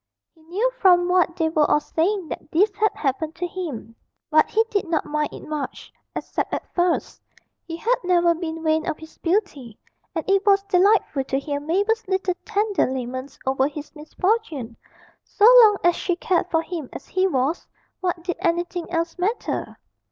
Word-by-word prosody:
He 320 - -25
knew 390 +10 -1
from 355 -2 +5
what 360 -2 +2
they 325 -3 +1
were 310 -2 +2
all - - +4
saying 345 +3 -1
that 300 - -7
this 395 +7 +2
had 430 -2 +2
happened 305 +3 -2
to 345 +2 -3
him, 305 - -6 0.4
but 310 0 +4
he 445 +1 +2
did 405 -3 0
not 330 -2 0
mind 300 0 -1
it - - -10
much, 305 -2 -5 0.2
except - - -3
at - - -5
first; 350 -1 0 0.5
he 330 -1 -5
had 480 +8 +1
never 350 -1 +3
been 325 -1 -5
vain 315 0 +1
of 310 - -3
his 320 0 -14
beauty, 330 - -2 0.4
and 325 - -3
it 390 0 +3
was 395 -1 +4
delightful 390 -6 +2
to 265 - -1
hear 285 +1 -3
Mabel's 405 +9 0
little 380 -1 0
tender 415 0 +1
laments 255 +1 -5
over 265 0 +2
his 300 0 -8
misfortune; 310 - -2 0.5
so 410 - +1 0.2
long 420 -3 +6
as 350 0 +4
she 355 - -1
cared 355 0 0
for 325 -1 +1
him 325 -6 -6
as - - -9
he 375 0 +2
was 280 0 -1 0.3
what 355 -2 -2
did 355 0 -3
anything 345 0 -1
else 335 +1 -2
matter? 415 +7 -2
340 Hz, 180 wpm, -23 LUFS, 305-380 Hz, 0.5 s, long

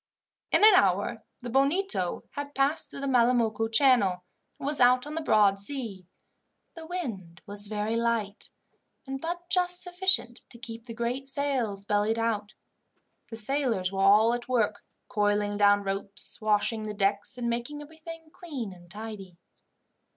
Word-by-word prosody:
In - - +3
an 430 -1 +9
hour 200 - +2 0.2
the 245 - -5
Bonito 275 - +1
had 285 0 -7
passed 275 +4 0
through - - -8
the 275 - -3
Malamocco 235 -3 +2
Channel, 220 -8 +3 0.3
and - - -8
was 290 -1 0
out 250 +1 +5
on 295 - -7
the 325 - -3
broad 205 -8 +3
sea. 200 -6 0 0.7
The 325 -1 -10
wind 205 - -6
was 205 0 -5
very 210 +1 -2
light, 230 -3 -2 0.6
and 270 0 -6
but 345 +1 -5
just 360 -1 +3
sufficient 360 -9 0
to 235 - -11
keep 230 0 -9
the 230 - -8
great 245 +4 -2
sails 255 -8 -1
bellied 210 +2 +1
out. 215 -2 -2 0.7
The 225 - -6
sailors 225 -6 +1
were 195 0 -2
all 210 +4 +5
at 240 +1 -5
work, 220 -5 0 0.2
coiling 205 0 0
down 205 0 +4
ropes, 200 +2 +1
washing 215 +1 +1
the 210 - -5
decks, 200 +4 0
and 240 -1 -3
making 240 +6 -3
everything 320 +1 -12
clean 270 - -6
and 175 -1 -17
tidy. 205 -3 -8
230 Hz, 155 wpm, -27 LUFS, 205-275 Hz, 0.7 s, an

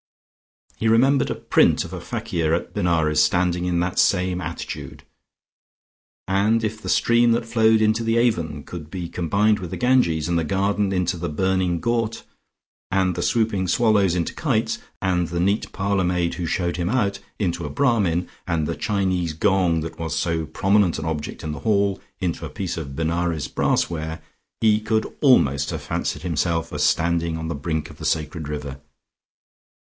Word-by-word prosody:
He 110 - 0
remembered 130 +5 +4
a - - -1
print - - +3
of - - -9
a - - -5
fakir 80 -1 -1
at 85 - -5
Benares, 80 -3 +2
standing 90 +2 +1
in 90 -1 +1
that 90 +1 +2
attitude; 90 -2 -4 1.2
and 105 +4 +2
if 110 0 -3
the - - -6
stream 120 0 +4
that 115 0 -1
flowed 110 -1 +3
into 110 +1 +2
the 115 0 +1
Avon 85 -12 0
could 80 -1 -8
be 90 -1 -5
combined 100 +6 +1
with 90 -3 -6
the - - -5
Ganges, 125 -12 +2
and 85 -1 +1
the - - 0
garden 100 +3 0
into 90 -1 0
the 85 0 -3
burning 90 +1 0
ghaut, 115 0 -1 0.7
and 95 -1 +1
the - - -3
swooping 110 -5 +1
swallows 100 -2 +3
into 85 -2 -1
the - - -11
kites, - - 0 0.2
and 90 -2 +1
the 85 +2 -3
neat 100 +5 0
parlour 100 -1 0
maid 90 -1 0
who 85 -2 -3
showed 85 0 -1
him 85 0 -1
out, 100 -6 0 0.2
into 90 -4 -1
a 75 - -4
Brahmin, 95 - +1 0.2
and 85 -3 0
the - - -2
Chinese 95 -5 -1
gong 90 -2 +2
that 80 +1 -7
was 80 -2 -3
so 80 -1 -1
prominent 95 -1 +2
an - - -5
object 75 -2 -4
in 80 - -3
the 75 - -6
hall 100 +1 +1 0.2
into 90 -3 -2
a - - -4
piece 95 -3 -4
of 70 -5 -6
Benares 80 0 -1
brassware, 80 0 -1 0.4
he 110 -1 +4
could 110 0 -1
almost 70 - +4
have - - -4
fancied 75 - -3
himself 85 -1 -1
as 75 0 -1
standing 85 +1 +1
on 80 0 -4
the - - -1
brink 80 +1 -3
of 75 - -15
the 80 - -6
sacred 75 0 -1
river. 70 -2 -6
90 Hz, 175 wpm, -23 LUFS, 80-105 Hz, 1.2 s, remembered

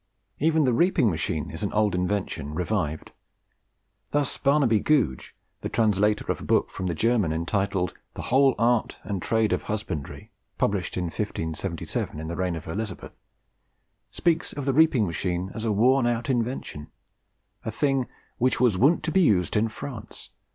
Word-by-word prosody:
Even 160 +1 +3
the 125 -3 +2
reaping 150 - +3
machine 80 -1 -2
is 80 - -7
an 100 - -1
old 105 -2 +2
invention 90 -5 -2
revived. 85 -3 -2 1.0
Thus 145 -2 +1
Barnabe 140 -6 +3
Googe, 125 - +1 0.3
the - - -3
translator 105 -1 +2
of - - -4
a - - -7
book - - +1
from 95 - -4
the 85 - -1
German 110 -4 +2
entitled 90 +3 -1 0.2
'The - - -5
whole 135 0 +4
Arte 120 -1 +2
and 100 -3 -3
Trade 110 +2 +1
of - - -2
Husbandrie,' 105 -9 -5 0.3
published 100 -3 -1
in 90 - 0
1577, 85 -3 -3
in 80 - -5
the 85 - -4
reign 90 -1 -1
of 80 - -8
Elizabeth, 100 +3 -5 0.9
speaks 170 -1 0
of 145 - -5
the 135 - +1
reaping 150 -6 +4
machine 90 +2 -2
as 110 - -5
a 110 - +1
worn 120 +5 +4
out 120 +3 0
invention 120 - -3 0.8
a - - -3
thing 135 +2 0 0.3
"which 130 +1 +2
was 120 -7 +3
woont 145 - +4
to - - -1
be 190 - +4
used 95 - +3
in 110 +1 +3
France. 115 -1 -9
105 Hz, 165 wpm, -26 LUFS, 90-130 Hz, 1.0 s, whole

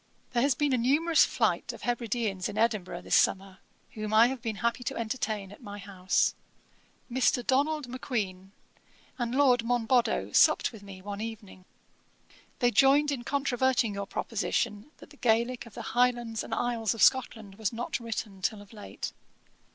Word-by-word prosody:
'There 240 -2 +1
has 275 0 +3
been 290 0 +1
a 255 - +2
numerous 305 +7 +4
flight - - 0
of - - -12
Hebrideans 230 -5 -2
in 210 - -7
Edinburgh 215 -5 0
this - - +1
summer, 190 0 +1 0.3
whom 215 0 -3
I 225 +2 +8
have 265 -2 -5
been 225 -2 -3
happy 235 +4 -1
to - - -2
entertain 220 -4 -3
at 205 - -14
my 205 -3 -8
house. 190 -2 0 0.7
Mr. 250 -1 +1
Donald 290 +1 +1
Macqueen 210 -7 -4 0.7
and 240 0 -2
Lord 255 -4 +4
Monboddo 240 0 +1
supped - - +4
with 220 -4 -12
me 195 -2 -11
one 205 +1 -5
evening. 210 -4 -8 0.9
They 245 0 +2
joined 280 +3 +4
in 260 -4 -3
controverting 260 -4 +1
your 200 0 -4
proposition, 210 +2 -2
that - - -15
the 290 - -16
Gaelick 235 0 +1
of 220 - -15
the - - -6
Highlands 240 -2 +1
and - - -10
Isles 230 -2 0
of 215 - +1
Scotland 220 -5 +2
was 220 - 0
not 240 +2 -3
written 220 -4 -5
till 205 +2 -2
of 205 - -19
late.' 210 -2 -7
230 Hz, 165 wpm, -29 LUFS, 205-250 Hz, 0.9 s, I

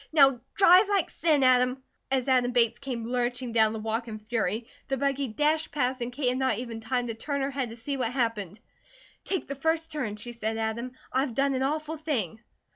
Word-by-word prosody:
Now 270 -5 +5
drive 385 +1 +7
like 395 -5 +1
sin, 305 -4 +2
Adam!" 255 0 +3 0.3
As 265 -1 0
Adam 250 -2 +3
Bates 235 -2 +2
came 250 -5 -4
lurching 245 0 -1
down 220 -1 +4
the 220 - -4
walk 225 +2 -2
in 215 -1 -5
fury 220 0 -2 0.2
the 270 - -1
buggy 275 0 0
dashed 300 +7 0
past 255 -3 -1
and 240 +1 -2
Kate 250 0 0
had 255 +1 -1
not 260 -5 +1
even 235 -2 -5
time 245 +2 -1
to 230 - -3
turn 280 +5 -3
her 270 +1 -1
head 265 -3 -2
to 225 - -8
see 275 +4 -3
what 245 -3 -1
happened. 225 -6 -2 0.6
"Take 380 -3 -2
the 280 - -4
first 320 +3 -1
turn," 255 -9 -3
she 225 +3 -6
said 225 -2 -3
to - - -4
Adam. 230 +3 -3 0.2
"I've 260 -2 0
done 275 0 +2
an 260 - -1
awful 310 +3 -1
thing." 245 - -2
250 Hz, 215 wpm, -27 LUFS, 230-280 Hz, 0.6 s, drive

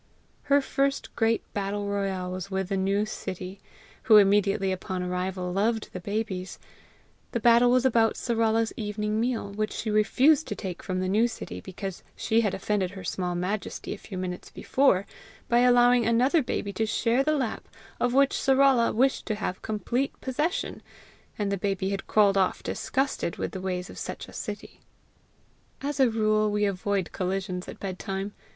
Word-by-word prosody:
Her 280 0 +4
first 275 +1 -1
great 225 0 +2
battle 205 0 -2
royal 195 -2 -2
was 185 +1 -5
with 190 -1 -2
the 200 - 0
new 195 +2 +1
Sittie,[B] 185 -2 -6 0.5
who 220 -3 +8
immediately 195 -1 +4
upon 185 0 -3
arrival 180 0 -2
loved 220 +3 0
the 185 - -4
babies. 195 -1 -3 0.8
The 235 - 0
battle 235 +1 +5
was 250 +1 +3
about 225 -3 +3
Sarala's 225 -1 +1
evening 210 -1 -2
meal, 230 -3 -1
which 215 +1 -2
she 220 - -3
refused 265 +8 +4
to 210 - -3
take 185 -2 -6
from 185 -1 -2
the 185 - -1
new 215 +5 +3
Sittie 225 - -7
because 190 0 -6
she 225 +1 +2
had 205 -4 0
offended 195 -1 -1
her 190 0 -9
small 180 -1 -2
majesty 190 +4 -3
a - - -7
few 195 - -8
minutes 180 -1 -5
before 255 -8 +2 0.4
by 240 - +3
allowing 245 0 +5
another 255 +7 +3
baby 205 -5 -3
to 220 +3 -1
share 235 +4 +2
the 305 +1 +1
lap 255 -5 -3 0.3
of 245 - +1
which 275 +2 +4
Sarala 270 -4 +3
wished 265 +4 +2
to 215 - 0
have 185 -3 -4
complete 235 +5 -2
possession; 300 +7 -2 0.6
and 205 -2 -1
the 200 - 0
baby 195 -1 -1
had 195 -1 -4
crawled 200 -2 +4
off 190 - 0
disgusted 265 -10 -1
with - - -3
the 190 - -6
ways 180 -1 -3
of - - -10
such - - -6
a - - -13
Sittie. - - -7 1.0
As 285 -1 -3
a 260 -2 +5
rule 215 -1 +2
we 210 0 +1
avoid 195 -1 -1
collisions 185 0 -3
at - - -9
bedtime. 195 +1 -4
210 Hz, 170 wpm, -27 LUFS, 190-235 Hz, 1.0 s, who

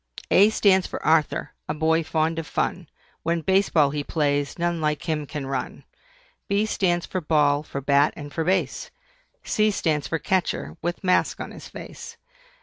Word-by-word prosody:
A 200 +3 +7
stands 190 -4 +3
for - - -5
ARTHUR, 155 -2 +2 0.2
a 150 - -1
boy 160 +1 +2
fond 160 +1 0
of 165 - -6
fun, - - -2 0.3
When 170 +1 0
Base 190 +3 +2
Ball 150 -4 +3
he 145 0 -2
plays, 145 -2 0
none 170 -1 -1
like 150 +1 -1
him 150 -3 -1
can 145 -1 -5
run. 135 -1 -4 0.6
B 200 +2 +2
stands 175 -5 0
for 185 - -3
BALL, 150 -2 +2
for 140 -2 -6
BAT, 140 +2 +3
and 145 -1 -9
for 165 - -1
BASE. 180 -5 0 0.5
C 215 0 +2
stands 155 -7 0
for 165 - -1
CATCHER, 185 +2 -1
with 175 +2 -3
mask 185 -1 +2
on - - -6
his - - -11
face. - - -10
160 Hz, 175 wpm, -24 LUFS, 150-180 Hz, 0.6 s, A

